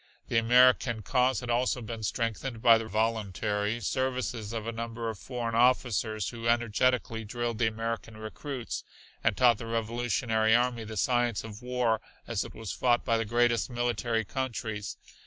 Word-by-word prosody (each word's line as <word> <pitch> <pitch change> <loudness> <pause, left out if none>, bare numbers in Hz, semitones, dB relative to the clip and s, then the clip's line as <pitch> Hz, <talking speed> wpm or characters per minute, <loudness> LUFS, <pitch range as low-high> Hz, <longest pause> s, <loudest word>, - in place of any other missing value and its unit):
The 115 - +3
American 120 -1 +4
cause 125 +4 +2
had 120 -1 -3
also 125 +1 +1
been 115 -1 -6
strengthened 115 +2 -2
by 115 0 +6
the 115 - -5
voluntary 105 0 -1
services 125 -2 -2
of 115 -2 -4
a 115 - -2
number 115 0 -4
of 105 - -11
foreign 120 -3 -4
officers, 115 -5 +2
who 115 -1 -5
energetically 120 0 +1
drilled 120 +1 -3
the 115 - +3
American 110 0 -4
recruits 120 +3 -5 0.4
and - - +2
taught 120 -4 +5
the 115 - -6
revolutionary 115 0 +1
army 120 -2 +1
the 110 0 -7
science 120 -1 +1
of 110 0 -9
war 125 -3 0 0.2
as 115 -4 -1
it - - -10
was 110 -5 -5
fought 120 -1 +1
by 115 - +2
the 115 0 0
greatest 120 +2 +2
military 120 -2 -1
countries. 110 -5 -4
115 Hz, 160 wpm, -29 LUFS, 110-120 Hz, 0.4 s, by